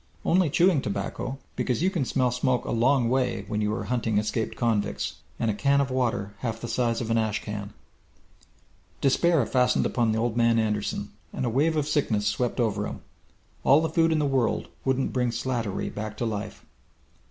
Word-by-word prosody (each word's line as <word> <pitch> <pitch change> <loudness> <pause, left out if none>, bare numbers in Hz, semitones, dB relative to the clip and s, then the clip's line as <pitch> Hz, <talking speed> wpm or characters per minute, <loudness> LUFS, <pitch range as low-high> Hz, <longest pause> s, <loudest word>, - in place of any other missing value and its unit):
Only 180 -2 +3
chewing 170 -1 +3
tobacco, 100 +5 -3 0.2
because 125 +5 -1
you 190 - +3
can 165 -8 -1
smell 125 0 +1
smoke 125 0 0
a - - -3
long 120 +1 +3
way 125 -5 0
when 105 0 -2
you 105 0 0
are 115 - -3
hunting 115 -4 0
escaped 110 +2 -1
convicts. 110 -4 -1 0.2
And 115 -2 +1
a - - -2
can 140 +6 +2
of 140 -2 0
water 115 -6 -1
half 115 -2 -3
the 120 - -5
size 120 -1 0
of 115 -1 -3
an 115 - +3
ash 110 -2 -1
can! 105 -1 -6 1.2
Despair 150 +1 +3
fastened 125 +2 +2
upon 115 -3 +1
Old 115 0 0
Man 115 -1 +3
Anderson, 105 -2 -1 0.2
and - - -3
a 120 - 0
wave 155 +5 +2
of 150 -2 0
sickness 120 -9 +1
swept 120 +5 0
over 105 -3 0
him. - - -7 0.6
All 140 - +6
the 160 0 0
food 165 -1 +3
in 160 - +2
the 150 - +1
world 135 -4 0 0.2
wouldn't 130 0 0
bring 125 -1 +1
Slattery 115 -3 -2
back 105 0 -5
to 120 - -1
life. 105 -2 -5
120 Hz, 190 wpm, -26 LUFS, 110-135 Hz, 1.2 s, All